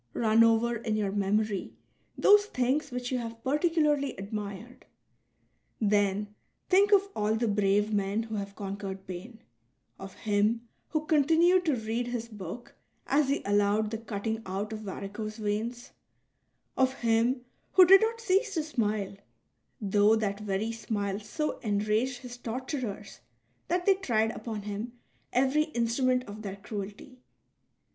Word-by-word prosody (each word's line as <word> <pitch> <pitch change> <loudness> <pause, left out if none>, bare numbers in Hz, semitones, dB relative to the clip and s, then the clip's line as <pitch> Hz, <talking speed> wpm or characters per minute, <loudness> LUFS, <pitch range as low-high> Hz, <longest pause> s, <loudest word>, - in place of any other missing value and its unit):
'* 115 - -42
Run 225 0 +4
over 230 +1 +3
in 220 -1 -2
your 205 -2 0
memory 205 0 0 0.4
those 410 0 +6
things 275 - 0
which 245 0 -4
you 255 - 0
have 230 -1 -7
particularly 295 -1 +1
admired. 205 +3 -7 0.9
Then 205 -1 +1 0.4
think 395 +2 +5
of 400 -1 +5
all 210 +1 +1
the 230 +1 0
brave 205 +1 +2
men 200 +2 0
who 225 -1 -8
have 200 -1 -4
conquered 195 -1 -6
pain: 210 +6 -9 0.6
of 195 -1 -9
him 215 +3 0 0.2
who 310 -1 -2
continued 330 +4 +4
to 305 -4 +2
read 230 +1 -2
his 235 -1 -4
book 210 +2 -8 0.3
as 280 -1 +2
he 280 - 0
allowed 205 +1 +2
the 225 - -3
cutting 220 0 -3
out 200 +3 -4
of 215 - -5
varicose 215 +1 -6
veins; 225 +4 -3 0.8
of 260 0 +2
him 235 +2 +2 0.3
who 370 - +9
did 385 +2 +8
not 455 +1 0
cease 405 -1 +1
to 320 - +1
smile, 210 -9 -1 0.6
though 205 0 +4
that 205 -2 -1
very 210 +2 -2
smile 205 -3 -3
so 300 +9 -3
enraged 215 +4 0
his 245 -1 -8
torturers 245 -4 -5 0.5
that 355 +1 0
they 395 - +6
tried 225 - 0
upon 220 -3 -6
him 210 +3 -5 0.4
every 270 +5 +2
instru 235 +2 +1
ment 255 0 +3
of 210 -2 -9
their 200 -2 -5
cruelty. 205 +5 -8
225 Hz, 145 wpm, -29 LUFS, 205-260 Hz, 0.9 s, who